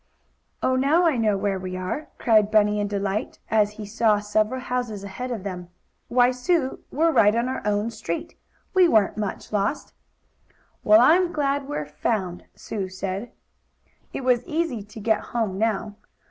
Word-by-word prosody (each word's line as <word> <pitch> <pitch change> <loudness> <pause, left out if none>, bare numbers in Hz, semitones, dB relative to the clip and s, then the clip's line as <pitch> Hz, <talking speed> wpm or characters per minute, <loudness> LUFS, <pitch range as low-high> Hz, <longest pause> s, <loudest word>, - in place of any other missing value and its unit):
"Oh, 260 - +2
now 290 +7 +3
I 320 -4 +3
know 215 -4 +1
where 195 -1 -1
we 185 0 -5
are!" 185 +12 -4
cried 215 -4 +3
Bunny, 210 -1 +3
in 205 - 0
delight, 200 +1 -2
as 210 -1 +3
he 210 0 -8
saw 215 0 +2
several 215 +4 0
houses 245 -5 -3
ahead 225 +6 -6
of 230 -6 -4
them. 180 -3 -6 0.4
"Why, 245 0 +4
Sue, 265 +2 0
we're 325 +4 +2
right 215 -6 +4
on 235 +2 +1
our 260 - -3
own 210 +2 0
street. 190 -7 -5 0.4
We 370 -2 +6
weren't 215 - +3
much 210 0 -5
lost!" 205 +7 -1 0.9
"Well, 215 +2 +7
I'm 345 +7 +5
glad 280 -2 -1
we're 150 - -3
found," 180 +4 -3
Sue 195 -4 -5
said. 190 +4 -5 0.8
It - - -5
was 250 -1 +2
easy 310 -8 -1
to 210 +2 -11
get 220 +1 +1 0.2
home 200 -5 -1
now. 215 -1 -1
220 Hz, 165 wpm, -24 LUFS, 205-255 Hz, 0.9 s, Well